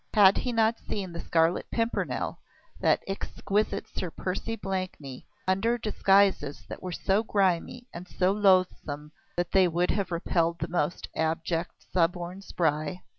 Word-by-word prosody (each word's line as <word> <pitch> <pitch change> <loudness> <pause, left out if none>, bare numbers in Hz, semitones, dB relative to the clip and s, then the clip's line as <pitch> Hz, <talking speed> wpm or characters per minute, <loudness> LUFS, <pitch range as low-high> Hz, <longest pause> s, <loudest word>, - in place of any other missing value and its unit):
Had 200 -2 +7
he 250 - -1
not 225 0 +2
seen 190 -4 -5
the 170 - -5
Scarlet 165 +1 +1
Pimpernel, 230 0 -1 0.4
that - - +3
exquisite 200 +1 -1
Sir 180 - -4
Percy 190 +7 -3
Blakeney, 185 - -5 0.2
under 210 +6 +2
disguises 195 -8 +2
that - - -7
were 185 - -5
so 195 +4 +1
grimy 200 +3 0
and 175 +2 -8
so 185 +1 +1
loathsome 185 -7 +2 0.3
that 175 0 -1
they 190 -1 +5
would 175 +1 +1
have 200 -2 -1
repelled 170 0 +1
the - - -3
most 175 -1 -1
abject, 165 +2 -2
suborned 175 +2 0
spy? 160 0 -1
185 Hz, 140 wpm, -28 LUFS, 170-200 Hz, 0.4 s, Had